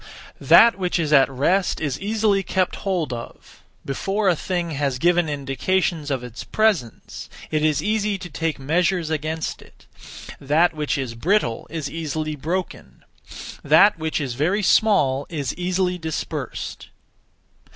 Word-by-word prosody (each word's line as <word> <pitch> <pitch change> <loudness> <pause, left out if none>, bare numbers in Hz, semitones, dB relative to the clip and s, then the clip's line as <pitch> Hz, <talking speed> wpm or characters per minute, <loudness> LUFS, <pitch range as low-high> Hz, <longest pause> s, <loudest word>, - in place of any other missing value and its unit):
1. - - -12
That 230 -3 +7
which 180 -1 0
is 155 -3 0
at 135 -2 +6
rest 170 +9 +1
is 145 -5 -2
easily 210 -1 +1
kept 185 -1 -1
hold 175 -9 -2
of; 115 -1 -10 0.2
before 195 +9 0
a 175 - +3
thing 175 0 -3
has 140 -3 -1
given 175 +2 +2
indications 150 +3 -1
of 135 -3 -2
its 125 -1 -8
presence, 205 - -1 0.2
it 155 -1 0
is 155 -2 +1
easy 210 -1 0
to 185 -1 -8
take 165 -1 -3
measures 165 +4 0
against 155 +1 -3
it; - - -20 0.5
that 155 +5 +2
which 150 -2 -2
is 130 -4 -4
brittle 120 - 0
is 155 -2 -4
easily 155 -1 -4
broken; 170 +6 -5 0.6
that 200 -4 +5
which 160 0 -2
is 135 -5 -3
very 175 - 0
small 145 -11 +3
is 145 -6 -3
easily 180 0 -1
dispersed. 160 -2 -5
160 Hz, 145 wpm, -22 LUFS, 145-185 Hz, 0.6 s, That